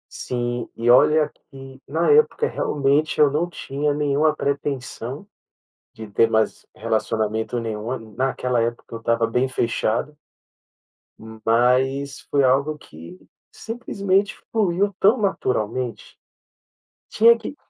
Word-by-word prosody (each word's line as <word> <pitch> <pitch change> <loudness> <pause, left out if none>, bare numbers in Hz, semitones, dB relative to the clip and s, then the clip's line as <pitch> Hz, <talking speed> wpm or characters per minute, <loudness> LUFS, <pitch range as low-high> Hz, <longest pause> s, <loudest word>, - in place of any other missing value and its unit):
Sim, 120 -1 -3
e 120 +1 +3
olha 150 +4 +5 0.2
que 135 -2 -12
na 160 +4 +1
época 455 +1 +3
realmente 145 +2 0
eu 150 -2 +5
não 165 +5 -1
tinha 145 -3 -2
nenhuma 150 +1 +1
pretensão 140 - -4 0.7
de 110 -1 -9
ter 105 +3 +3
mais 110 0 0
relacionamento 110 +1 -1
nenhum, 115 +1 -5
naquela 125 -2 0
época 115 +1 -2
eu 115 - -5
estava 115 0 0
bem 125 +3 +1
fechado. 120 +3 -1 1.3
Mas 130 +4 +1
foi 140 -1 +3
algo 140 +4 +2
que 85 - -13 0.3
simplesmente 200 -4 -1
fluiu 200 -2 +1
tão 210 +6 +5
naturalmente, 125 - -2 0.9
tinha 230 +2 +5
que 230 +5 -8
135 Hz, 110 wpm, -22 LUFS, 115-155 Hz, 1.3 s, olha